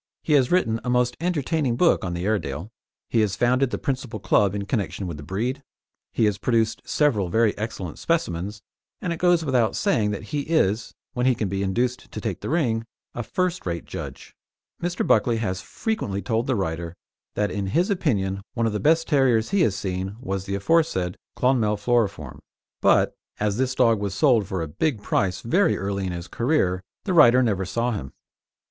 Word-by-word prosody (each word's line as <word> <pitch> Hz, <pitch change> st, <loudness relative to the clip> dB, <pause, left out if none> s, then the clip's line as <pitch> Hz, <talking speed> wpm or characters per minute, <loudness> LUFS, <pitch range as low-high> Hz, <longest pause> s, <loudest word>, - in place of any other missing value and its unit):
He 155 Hz, -, +1 dB
has 135 Hz, -4 st, +4 dB
written 115 Hz, -11 st, +2 dB
a -, -, -3 dB
most 125 Hz, 0 st, +2 dB
entertaining 155 Hz, -6 st, 0 dB
book 170 Hz, +7 st, +3 dB
on 90 Hz, -2 st, -3 dB
the 85 Hz, +1 st, -3 dB
Airedale; 90 Hz, -3 st, -2 dB, 0.4 s
he 115 Hz, -, +2 dB
has 100 Hz, -3 st, +1 dB
founded 125 Hz, +4 st, +2 dB
the -, -, -2 dB
principal 130 Hz, -5 st, -3 dB
club 100 Hz, 0 st, +2 dB
in 100 Hz, -1 st, -3 dB
connection 100 Hz, -3 st, -2 dB
with 85 Hz, -4 st, -5 dB
the -, -, -8 dB
breed; 115 Hz, -, -3 dB, 0.5 s
he 115 Hz, -, +2 dB
has 105 Hz, -2 st, 0 dB
produced 115 Hz, -1 st, +1 dB
several 115 Hz, -, +1 dB
very 110 Hz, +2 st, +2 dB
excellent 100 Hz, -6 st, -5 dB
specimens, 105 Hz, -, -1 dB, 0.4 s
and 175 Hz, -, -2 dB
it 165 Hz, -, -7 dB
goes 175 Hz, -2 st, +3 dB
without 125 Hz, -5 st, +2 dB
saying 115 Hz, -, +1 dB
that 105 Hz, +1 st, -4 dB
he 150 Hz, -, +1 dB
is 130 Hz, -, 0 dB, 0.2 s
when 125 Hz, -1 st, +1 dB
he 130 Hz, -, +4 dB
can 105 Hz, -, -1 dB
be 95 Hz, +1 st, -2 dB
induced 120 Hz, +6 st, -1 dB
to -, -, -5 dB
"take 105 Hz, -6 st, -4 dB
the -, -, -4 dB
ring" 125 Hz, -9 st, +1 dB, 0.3 s
a 120 Hz, -, -3 dB
first 180 Hz, -, -2 dB
rate 85 Hz, -1 st, -3 dB
judge. -, -, -8 dB, 0.5 s
Mr. 175 Hz, +1 st, -1 dB
Buckley 115 Hz, +2 st, +3 dB
has 100 Hz, -4 st, -2 dB
frequently 215 Hz, -, -3 dB
told 115 Hz, 0 st, 0 dB
the 130 Hz, -, +1 dB
writer 85 Hz, -3 st, -3 dB, 0.4 s
that 105 Hz, 0 st, 0 dB
in 100 Hz, -2 st, -2 dB
his 175 Hz, -, +1 dB
opinion 100 Hz, -, 0 dB
one 115 Hz, -1 st, +1 dB
of 110 Hz, -, 0 dB
the 105 Hz, -, -1 dB
best 165 Hz, +5 st, +3 dB
terriers 130 Hz, -6 st, +3 dB
he 200 Hz, -2 st, +3 dB
has 105 Hz, -, +2 dB
seen 95 Hz, +1 st, -3 dB
was 95 Hz, -5 st, -3 dB
the 100 Hz, -, -2 dB
aforesaid 100 Hz, -, +1 dB, 0.2 s
Clonmel 115 Hz, -5 st, +2 dB
Floriform, 100 Hz, -, 0 dB, 0.4 s
but, -, -, +4 dB, 0.3 s
as 105 Hz, -1 st, 0 dB
this 130 Hz, 0 st, 0 dB
dog 115 Hz, -4 st, +4 dB
was 100 Hz, -1 st, -3 dB
sold 120 Hz, -, +3 dB
for 95 Hz, -3 st, -2 dB
a -, -, -4 dB
big 105 Hz, -, -1 dB
price 95 Hz, -2 st, 0 dB
very 185 Hz, +13 st, +2 dB
early 100 Hz, -1 st, -2 dB
in -, -, -2 dB
his 85 Hz, 0 st, -6 dB
career, 115 Hz, -, +1 dB, 0.2 s
the 190 Hz, -, -1 dB
writer 130 Hz, -6 st, +7 dB
never 100 Hz, -5 st, 0 dB
saw 115 Hz, +6 st, -1 dB
him. 75 Hz, -, -5 dB
110 Hz, 195 wpm, -24 LUFS, 95-130 Hz, 0.5 s, writer